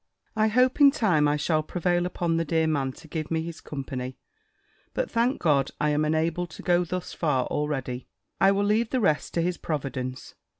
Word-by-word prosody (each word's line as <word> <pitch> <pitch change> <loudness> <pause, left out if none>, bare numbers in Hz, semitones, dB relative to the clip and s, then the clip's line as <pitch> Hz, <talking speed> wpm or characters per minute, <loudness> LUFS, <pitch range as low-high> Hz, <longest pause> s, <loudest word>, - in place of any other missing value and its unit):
I 215 0 +3
hope 255 +5 +2
in 280 - +10
time, 180 - +2
I 145 0 +2
shall 155 +1 +1
prevail 175 +2 0
upon 170 -2 -1
the 165 - +1
dear 160 0 +1
man 140 -4 0
to 165 - -15
give 155 -1 -4
me 160 -1 0
his 165 -1 -7
company. 130 -3 -5 0.8
But, - - -1
thank 240 +4 +1
God, 140 -5 +2
I 150 - +2
am 150 +1 +1
enabled 160 +3 0
to - - -10
go 175 0 +3
thus 180 +1 -4
far 140 -6 +1
already! 135 -4 -3 0.3
I 195 +1 +6
will 200 +1 +1
leave 220 +2 +2
the 260 - 0
rest 155 -10 +1
to 170 - +2
his 180 0 -1
providence. 130 -4 -4
160 Hz, 200 wpm, -26 LUFS, 150-180 Hz, 0.8 s, in